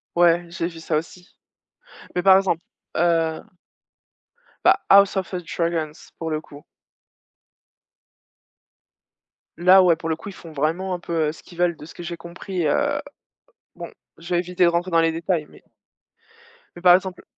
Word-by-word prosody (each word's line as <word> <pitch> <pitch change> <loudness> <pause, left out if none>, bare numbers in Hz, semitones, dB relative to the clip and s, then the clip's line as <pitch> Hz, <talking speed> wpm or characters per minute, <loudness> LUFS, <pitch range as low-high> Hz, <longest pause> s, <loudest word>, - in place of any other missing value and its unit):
Ouais, 175 0 +4
j'ai 170 -1 -3
vu 165 -2 -11
ça 160 -1 -1
aussi, 180 +3 -7 0.8
mais 180 - 0
par 190 -1 +7
exemple 185 -4 0 0.4
heu 165 -1 +1 1.2
bah, - - +7 0.2
House 200 0 +6
of 190 0 -3
a 180 - -2
dragons 165 -2 -3
pour 165 -1 -4
le 155 -1 -1
coup. 145 -1 -15 2.9
Là, 185 +2 +6
ouais, 175 -3 +4
pour 165 0 -6
le 160 - 0
coup, 205 - -10
ils - - -7
font 165 -4 -12
vraiment 165 +6 -1
un 175 - -6
peu, 165 -3 -1
heu, - - -2
ce 160 - -15
qu'ils 175 - -16
veulent 175 -1 +1
de 150 - -12
ce - - -13
que 175 - -9
j'ai 170 0 -5
compris, 170 +1 -5
heu 145 - +1 0.8
bon, - - -8 0.3
je 170 +2 -6
vais - - +3
éviter 180 0 -1
de 170 - +5
rentrer 175 +2 -1
dans 165 - +4
les 165 0 +2
détails 165 -1 -1
mais - - -18 1.1
mais 175 - -11
par 180 -1 +8
exemple 185 -1 -1
170 Hz, 175 wpm, -22 LUFS, 165-180 Hz, 2.9 s, par